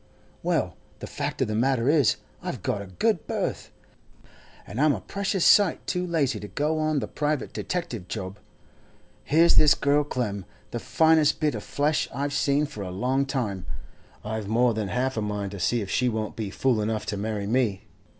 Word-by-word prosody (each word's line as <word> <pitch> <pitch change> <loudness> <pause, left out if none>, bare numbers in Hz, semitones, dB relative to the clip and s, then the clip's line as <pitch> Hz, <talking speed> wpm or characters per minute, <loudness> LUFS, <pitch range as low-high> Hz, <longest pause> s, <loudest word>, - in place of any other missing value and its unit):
Well, - - 0 0.2
the - - -7
fact - - -2
of - - -2
the 110 - -2
matter 120 +2 +1
is, 145 -4 +4 0.3
I've - - -5
got 100 - -1
a 100 - -8
good 90 -1 0
berth, - - -2 1.0
and 115 +7 -4
I'm 150 -1 +5
a - - -5
precious 195 -2 -1
sight 200 -5 +5
too 180 -1 -1
lazy 155 -6 0
to 105 - -7
go 150 +10 -1
on 155 -1 +1
the - - -1
private 150 -1 -2
detective 120 - -4
job. 95 +3 -5 0.8
Here's 165 +3 +4
this 150 -2 +7
girl 145 +1 +2
Clem, 105 -9 -3 0.3
the 120 - -3
finest 160 +2 +3
bit 150 -2 +1
of 105 - -4
flesh 150 +7 0
I've 140 +3 -2
seen 145 +1 +2
for 145 -8 -8
a 95 - -4
long 130 +9 0
time; 105 - -2 0.6
I've 110 -1 -3
more 120 +3 +3
than 110 -2 -2
half 130 +4 -1
a - - +1
mind 105 -2 -3
to 100 - -7
see 120 +6 +1
if 100 - -5
she 125 0 +2
won't 110 -2 -3
be 110 -3 -3
fool 120 +2 +1
enough 105 0 -1
to 105 - -2
marry 105 0 -2
me. 110 -4 +1
125 Hz, 190 wpm, -26 LUFS, 105-150 Hz, 1.0 s, this